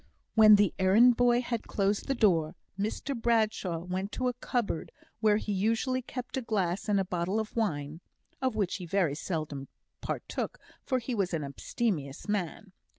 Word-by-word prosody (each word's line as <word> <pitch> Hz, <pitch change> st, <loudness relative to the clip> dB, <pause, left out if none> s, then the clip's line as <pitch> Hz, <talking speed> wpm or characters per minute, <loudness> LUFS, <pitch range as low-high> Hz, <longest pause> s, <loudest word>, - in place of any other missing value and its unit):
When 215 Hz, -1 st, +8 dB
the 205 Hz, -3 st, +3 dB
errand 220 Hz, +6 st, +6 dB
boy 245 Hz, 0 st, +4 dB
had 235 Hz, -2 st, -3 dB
closed 200 Hz, 0 st, 0 dB
the 275 Hz, -, +1 dB
door, 175 Hz, -8 st, +2 dB, 0.2 s
Mr 215 Hz, +7 st, -2 dB
Bradshaw 220 Hz, -6 st, +1 dB
went 185 Hz, +3 st, -3 dB
to 255 Hz, -1 st, 0 dB
a -, -, -3 dB
cupboard 240 Hz, -8 st, -2 dB, 0.3 s
where 215 Hz, -1 st, +4 dB
he 210 Hz, -, -3 dB
usually 225 Hz, +6 st, +1 dB
kept 250 Hz, +1 st, -6 dB
a -, -, 0 dB
glass 200 Hz, -4 st, -1 dB
and 200 Hz, -1 st, +3 dB
a 190 Hz, -, 0 dB
bottle 180 Hz, +3 st, -1 dB
of 220 Hz, -1 st, -5 dB
wine 155 Hz, -8 st, -2 dB, 0.4 s
(of 260 Hz, -4 st, 0 dB
which 200 Hz, -4 st, 0 dB
he 180 Hz, -3 st, -7 dB
very 175 Hz, -5 st, +1 dB
seldom 150 Hz, -4 st, -4 dB, 0.3 s
partook, -, -, -4 dB, 0.3 s
for 260 Hz, -, 0 dB
he 250 Hz, +1 st, -3 dB
was 195 Hz, -6 st, 0 dB
an 155 Hz, -, -2 dB
abstemious 140 Hz, -, -3 dB
man). 200 Hz, -1 st, -3 dB
205 Hz, 170 wpm, -30 LUFS, 180-235 Hz, 0.4 s, When